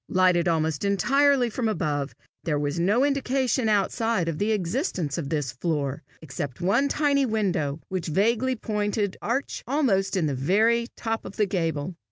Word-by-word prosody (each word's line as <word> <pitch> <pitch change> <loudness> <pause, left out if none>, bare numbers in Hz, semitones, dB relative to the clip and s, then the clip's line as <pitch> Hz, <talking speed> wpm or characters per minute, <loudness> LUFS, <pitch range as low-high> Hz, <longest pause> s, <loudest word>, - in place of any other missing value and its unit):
Lighted 180 -2 +3
almost 160 -2 0
entirely 260 +6 +3
from 230 +1 -1
above, 150 -9 -2 0.3
there 155 -4 0
was 145 +3 -2
no 210 +10 +3
indication 265 -3 0
outside 210 -1 +1
of 165 -2 -3
the 210 +2 +1
existence 185 - -1
of 140 -4 -4
this 145 -5 -1
floor, 140 -1 -2 0.2
except 140 -3 -5
one 205 +11 +2
tiny 280 -1 +2
window, 180 -10 -1
with 185 -3 -3
vaguely 230 +10 +1
pointed 210 -3 -2
arch, 245 +6 -2
almost 215 -9 +1
in 170 - +1
the 145 - 0
very 220 - +2
top 225 -1 -3
of - - -9
the 210 - +2
gable. 170 -4 -2
195 Hz, 160 wpm, -25 LUFS, 160-235 Hz, 0.3 s, Lighted